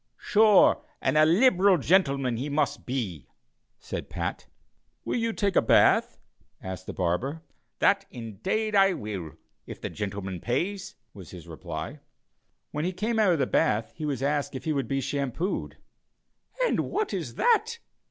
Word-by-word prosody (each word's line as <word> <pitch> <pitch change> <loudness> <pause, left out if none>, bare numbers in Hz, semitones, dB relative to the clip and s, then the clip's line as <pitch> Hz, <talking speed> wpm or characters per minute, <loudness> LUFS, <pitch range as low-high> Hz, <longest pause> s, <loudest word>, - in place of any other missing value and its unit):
"Sure 220 +10 +4 0.2
and - - 0
a 155 0 +6
liberal 190 0 +5
gintleman 140 -7 +2
he 130 +6 -3
must 145 0 -1
be," 100 - -4 0.5
said - - -6
Pat. - - -4 0.6
"Will - - -1
you 230 0 0
take 200 -3 -1
a - - +6
bath?" - - +4 0.4
asked 95 0 -7
the - - -3
barber. 125 - -2 0.3
"That 195 0 +2
indade 185 - -3
I 195 -1 +5
will, 100 - -6 0.3
if - - -8
the - - -5
gintleman 95 -3 -5
pays," 180 +11 -2 0.2
was 95 -5 -11
the 90 - -10
reply. 80 -2 -7 0.7
When 150 - -3
he 185 +2 -1
came 220 +5 -1
out 200 -5 +4
of - - +1
the 135 - +1
bath 110 -2 +1
he 155 - -5
was 135 -3 -2
asked 145 -1 -1
if 130 - -6
he 155 - -1
would 135 -4 -2
be 135 +2 -1
shampooed. 140 - -3 0.9
"And - - +1
what 430 0 -2
is - - -4
that?" 465 0 +2
145 Hz, 160 wpm, -27 LUFS, -, 0.9 s, a